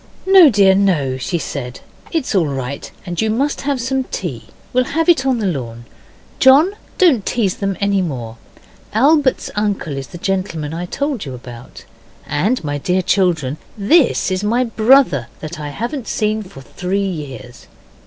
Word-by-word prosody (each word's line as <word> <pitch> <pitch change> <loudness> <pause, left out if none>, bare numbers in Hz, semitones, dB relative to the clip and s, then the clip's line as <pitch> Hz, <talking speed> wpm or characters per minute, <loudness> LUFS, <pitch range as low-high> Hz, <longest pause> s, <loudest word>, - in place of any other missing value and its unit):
'No, 380 -5 +8
dear, 200 -4 +5
no,' 165 -10 +1
she 170 +7 -2
said, 130 -6 -6 0.3
'it's 325 -8 -1
all 180 -6 +2
right, 135 0 -5 0.2
and 175 -2 -3
you 220 - +1
must 275 +7 0
have 280 -2 -1
some 260 +2 -1
tea - - -5 0.3
we'll 255 0 +3
have 325 - +2
it 275 -6 +4
on 260 -2 +2
the 220 - -2
lawn. 120 -9 -4 0.5
John, 280 +8 +6 0.3
don't 310 - +4
tease 205 -5 0
them 195 -2 -2
any 200 -1 +1
more. 120 -9 -5 0.6
Albert's 275 +4 +2
uncle 205 -8 -1
is 135 -1 -5
the - - -10
gentleman 170 -5 -2
I 175 +2 -4
told 280 +2 -2
you 130 -3 -6
about. 120 -1 -11 0.4
And, 165 - 0
my 145 -1 -3
dear 180 +5 0
children, 165 -8 +1 0.2
this 235 - +3
is 185 +1 -1
my 235 +4 +2
brother 230 - +3
that 155 +1 -7
I 150 -1 -5
haven't 235 - -5
seen 215 0 0
for 185 -9 -11
three 185 +9 -3
years. 135 - -7
195 Hz, 165 wpm, -18 LUFS, -, 0.6 s, No